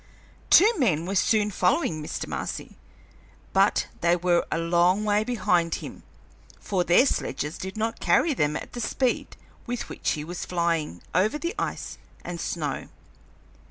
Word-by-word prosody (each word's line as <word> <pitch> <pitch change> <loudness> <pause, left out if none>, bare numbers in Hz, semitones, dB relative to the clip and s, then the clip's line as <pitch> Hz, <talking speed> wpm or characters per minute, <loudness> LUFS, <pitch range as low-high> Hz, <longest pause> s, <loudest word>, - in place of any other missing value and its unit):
Two 415 +6 +8
men 170 - +2
were 190 - -3
soon 210 +1 +2
following 180 - +1
Mr. 150 - -4
Marcy, - - -5 0.8
but - - +3
they 170 +1 +3
were 175 0 +1
a - - +1
long 175 +4 +2
way 210 0 +2
behind 185 -8 +1
him, - - -8 0.6
for 185 -3 -1
their 175 +10 +5
sledges 150 - -2
did 190 +3 -6
not 225 +1 -2
carry 240 - +3
them 150 - 0
at - - -6
the 240 - -4
speed 255 +2 -1 0.3
with 245 0 -4
which - - -1
he 150 - -4
was 175 +3 -6
flying 170 - -1
over 210 +10 +2
the 340 +3 -3
ice - - -4 0.3
and 175 -1 -5
snow. 150 -5 -3
180 Hz, 155 wpm, -26 LUFS, 170-220 Hz, 0.8 s, Two